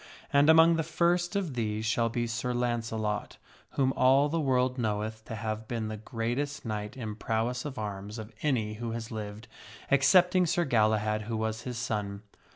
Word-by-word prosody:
And 140 +2 +5
among 165 +1 +7
the - - +2
first 175 +3 +1
of 185 -8 -1
these 110 -2 -2
shall 115 0 +1
be 120 +1 -1
Sir 120 +2 -2
Launcelot, 115 -3 -2 0.4
whom 135 -1 +2
all 135 +3 +4
the 165 +2 0
world 130 -3 +1
knoweth 110 0 -2
to 110 - -6
have 110 0 -4
been 115 -2 -3
the 110 - -5
greatest 120 +6 -3
knight 105 +2 -4
in 110 -4 -4
prowess 115 +4 -1
of 145 -3 -5
arms 105 0 -5
of 110 +1 -8
any 115 -8 0
who 115 -1 -3
has 115 0 -5
lived, 105 0 -6 0.4
excepting 180 +6 +5
Sir 175 +2 +1
Galahad, 110 -3 +2
who 115 0 -3
was 110 +1 -2
his 125 -1 -5
son. 105 -3 -3
115 Hz, 175 wpm, -29 LUFS, 110-135 Hz, 0.4 s, among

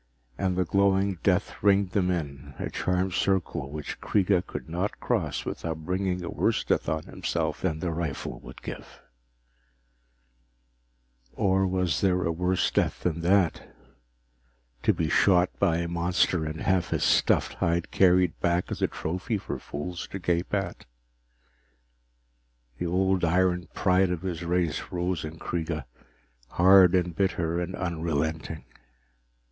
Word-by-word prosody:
And 90 +5 -1
the 90 - +2
glowing 100 0 +2
death - - 0
ringed 100 -2 +3
them 90 -2 +1
in, 70 -6 -4
a - - -4
charmed 90 0 0
circle 95 -8 0
which 75 0 -6
Kreega 95 -2 +2
could - - -6
not 90 +5 -3
cross - - -1
without 80 -1 -4
bringing 90 0 -1
a 85 - -4
worse - - +1
death - - 0
on 80 0 -1
himself - - -3
than 80 -4 -1
the 90 - -1
rifle 80 -3 -4
would - - -12
give - - -8 2.3
Or 95 -2 +2
was 90 -5 0
there 90 -2 +2
a 85 - 0
worse 90 +2 0
death - - 0
than 85 -1 -1
that 90 0 +2 1.1
to - - +4
be 85 -5 -1
shot 90 +2 +4
by 85 -5 +3
a 85 0 -2
monster 85 -1 +1
and 80 +1 -5
have 95 -3 +1
his - - 0
stuffed - - +3
hide 85 0 0
carried 90 -2 +3
back 85 +1 0
as - - -4
a - - +3
trophy 90 +7 -3
for - - -5
fools 85 +5 -6
to - - -6
gape 85 -1 -1
at? 95 -9 -3 1.9
The 90 - -1
old 95 +1 +1
iron 90 +1 +2
pride 95 -1 +3
of 90 0 -3
his 90 -3 -3
race 85 -3 0
rose 90 -1 -2
in 80 +1 -7
Kreega, 80 -2 -3 0.6
hard 95 0 +6
and 90 -2 0
bitter 85 -3 0
and 90 +1 -4
unrelenting. 80 -2 -2
90 Hz, 145 wpm, -27 LUFS, 85-95 Hz, 2.3 s, hard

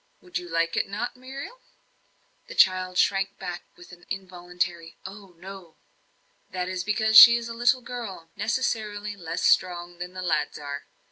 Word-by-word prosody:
Would 180 -1 -5
you 175 - -10
not - - -12
like 165 0 0
it, 215 +5 -2
Muriel?" 270 - -9 0.9
The - - -10
child 185 -1 +3
shrank 195 0 +1
back 180 -2 -7
with 175 - -15
an 175 0 -16
involuntary 180 -3 -5
"Oh, 195 -2 -11
no." 185 -2 -11 0.7
"That 180 0 -3
is 185 -1 -3
because 220 +2 0
she 235 +1 +11
is 235 0 -6
a 230 - -6
little 240 +2 +2
girl, 225 -9 -8
necessarily 215 -3 -2
less 170 -3 -5
strong 175 -1 +1
than 180 +1 -7
the 185 0 -6
lads 160 -4 -1
are. 145 -1 -7
185 Hz, 160 wpm, -25 LUFS, 175-220 Hz, 0.9 s, she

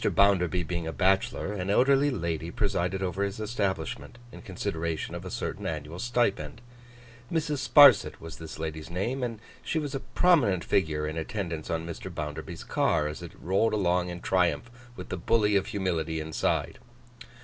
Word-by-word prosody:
BOUNDERBY 90 -3 +3
being 85 0 -3
a - - -2
bachelor, 95 +4 +1
an 95 -2 -3
elderly 135 +6 +4
lady 85 - -2
presided 95 -1 -1
over 95 +1 -2
his 100 +1 -2
establishment, 100 - -3
in - - -11
consideration 85 -6 -3
of - - -6
a - - -5
certain - - -4
annual 80 +4 -5
stipend. 120 -2 0 0.7
Mrs. 150 -4 -1
Sparsit 130 - +7
was 80 -1 -9
this 80 -1 -8
lady's 80 -1 -5
name; 110 +10 -2
and 120 -3 -2 0.2
she - - -2
was 145 -3 -2
a 135 - -1
prominent 130 - +3
figure 75 -5 +1
in 80 +1 -4
attendance 80 -2 -4
on 80 0 -2
Mr. 85 +2 -6
Bounderby's 75 -3 -6
car, 75 -2 +1
as 75 +2 -6
it 85 - -10
rolled 95 +6 +1
along 90 -3 +1
in 90 0 -6
triumph 95 +5 +1 0.2
with - - -8
the 95 - -3
Bully 105 +3 +2
of 100 - +2
humility 85 -5 -1
inside. 80 0 -1
95 Hz, 165 wpm, -28 LUFS, 80-110 Hz, 0.7 s, Sparsit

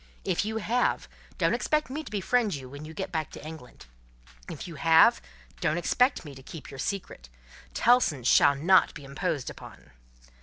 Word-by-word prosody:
If 190 +1 0
you 220 +1 -3
have, 240 +3 0 0.3
don't - - +2
expect 305 -3 0
me 305 +3 -4
to - - -10
befriend 210 0 0
you 135 -2 -8
when 145 +3 -9
you 155 - -9
get 190 +1 -4
back 160 -2 -2
to - - -10
England. 155 - -11 0.6
If - - -7
you 170 - -8
have, 160 +2 +5 0.4
don't 155 - 0
expect 250 +4 +1
me 145 - -9
to 135 - -12
keep 150 +3 -10
your 135 - -10
secret. 155 - -5 0.5
Tellson's 220 - +3
shall 140 - +5
not 180 +7 +4
be 145 - -9
imposed 140 0 -3
upon." - - -14
165 Hz, 180 wpm, -27 LUFS, 145-210 Hz, 0.6 s, have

